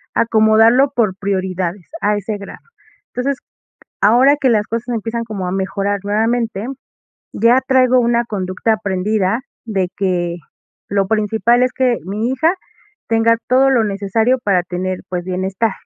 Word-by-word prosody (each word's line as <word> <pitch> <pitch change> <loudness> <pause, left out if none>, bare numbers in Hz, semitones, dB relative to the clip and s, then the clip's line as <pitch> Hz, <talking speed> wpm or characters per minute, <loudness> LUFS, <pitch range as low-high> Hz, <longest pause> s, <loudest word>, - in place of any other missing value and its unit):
acomodarlo 225 +4 +4
por 215 -6 +1
prioridades 185 -2 -3
a 210 0 +2
ese 205 +1 -4
grado. 200 - -10 0.5
Entonces, 260 +2 -1 0.6
ahora 250 +7 +5
que 265 - +3
las 215 -3 +2
cosas 230 +2 -4
empiezan 230 +1 -3
como 200 -5 -5
a 180 - -3
mejorar 195 +1 -2
nuevamente, 220 +1 -1 0.7
ya 235 +4 +4
traigo 255 -1 +4
una 235 0 +1
conducta 195 +1 -2
aprendida 205 +2 -1 0.3
de 190 -5 -1
que 175 -3 -1 0.5
lo 195 -1 +1
principal 220 +3 +2
es 255 0 +1
que 250 -3 +1
mi 215 +5 -2
hija 320 +7 +2 0.5
tenga 230 0 +3
todo 265 +2 +4
lo 235 -4 +3
necesario 210 +5 0
para 185 -3 +2
tener, 185 +1 -4
pues, 175 -1 -3
bienestar. 190 +3 -1
215 Hz, 140 wpm, -17 LUFS, 195-235 Hz, 0.7 s, ahora